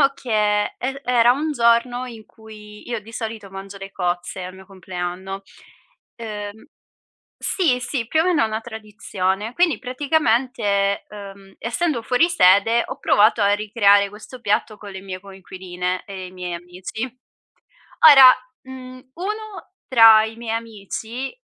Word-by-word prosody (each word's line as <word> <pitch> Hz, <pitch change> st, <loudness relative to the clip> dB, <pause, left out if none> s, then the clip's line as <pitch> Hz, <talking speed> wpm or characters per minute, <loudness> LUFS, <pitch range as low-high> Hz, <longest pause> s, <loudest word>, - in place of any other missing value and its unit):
diciamo 275 Hz, -, +6 dB
che 255 Hz, -, -10 dB, 0.5 s
er 270 Hz, +2 st, -4 dB
era 245 Hz, -1 st, +4 dB
un 300 Hz, +3 st, -2 dB
giorno 240 Hz, 0 st, +2 dB
in 230 Hz, -3 st, -10 dB
cui 210 Hz, -1 st, -14 dB
io 235 Hz, -1 st, -2 dB
di 220 Hz, +2 st, -14 dB
solito 220 Hz, -3 st, -6 dB
mangio 195 Hz, +1 st, -9 dB
le 195 Hz, 0 st, -9 dB
cozze 180 Hz, 0 st, -3 dB
al 185 Hz, +1 st, -8 dB
mio 190 Hz, 0 st, -14 dB
compleanno, 185 Hz, 0 st, -6 dB, 0.7 s
uhm 210 Hz, -2 st, -7 dB, 0.8 s
sì, 315 Hz, -10 st, +1 dB
sì, 250 Hz, -3 st, -3 dB
più 315 Hz, +6 st, +2 dB
o -, -, 0 dB
meno 350 Hz, -7 st, +2 dB
è -, -, +3 dB
una 220 Hz, +1 st, -4 dB
tradizione. 210 Hz, -2 st, -4 dB
Quindi 350 Hz, -2 st, +2 dB
praticamente, 245 Hz, -7 st, 0 dB
uhm, 195 Hz, -1 st, -11 dB
essendo 245 Hz, +3 st, -1 dB
fuori 250 Hz, +9 st, +2 dB
sede, 225 Hz, -, +4 dB
ho -, -, -6 dB
provato 215 Hz, +2 st, +3 dB
a 200 Hz, 0 st, +4 dB
ricreare 205 Hz, -1 st, +3 dB
questo 215 Hz, +5 st, -12 dB
piatto 215 Hz, -1 st, -1 dB
con 205 Hz, -1 st, -10 dB
le 190 Hz, 0 st, -8 dB
mie 190 Hz, -1 st, -7 dB
coinquiline 185 Hz, -1 st, -6 dB
e 190 Hz, -2 st, -8 dB
i -, -, -13 dB
miei 180 Hz, -1 st, -6 dB
amici. 180 Hz, +5 st, -7 dB, 1.1 s
Ora, 265 Hz, -3 st, +9 dB, 0.3 s
mhmm, 255 Hz, -1 st, -11 dB
uno 425 Hz, +4 st, -6 dB, 0.2 s
tra 225 Hz, -3 st, +7 dB
i 220 Hz, 0 st, -6 dB
miei 230 Hz, -1 st, -3 dB
amici 230 Hz, -, -7 dB
220 Hz, 150 wpm, -21 LUFS, 195-250 Hz, 1.1 s, Ora